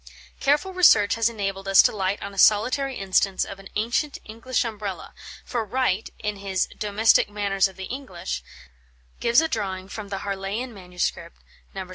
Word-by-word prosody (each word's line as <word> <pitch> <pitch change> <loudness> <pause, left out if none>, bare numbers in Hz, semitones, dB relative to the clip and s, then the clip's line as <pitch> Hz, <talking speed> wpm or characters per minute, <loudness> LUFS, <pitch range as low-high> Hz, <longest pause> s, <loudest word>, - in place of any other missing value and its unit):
Careful 300 +7 +1
research 225 - +5
has 230 0 +2
enabled 195 -3 -4
us 195 0 +7
to - - +2
light 195 0 -1
on 200 - -6
a - - -13
solitary 255 +7 +4
instance 195 -1 +1
of 195 - -9
an 195 - -11
ancient 235 +7 0
English 230 +3 -2
Umbrella, 210 -4 -5 0.3
for 240 -2 -2
Wright, 220 -2 0
in 210 -1 -3
his 195 -2 -1
"Domestic 210 +1 +3
Manners 200 -2 +1
of 190 - -14
the 190 - -7
English," 240 -6 -5 0.8
gives 235 +4 +4
a 325 - 0
drawing 195 -9 -3
from 205 0 -7
the 195 -1 -4
Harleian 200 +5 -3
MS. 180 -3 -2
205 Hz, 160 wpm, -24 LUFS, 195-235 Hz, 0.8 s, us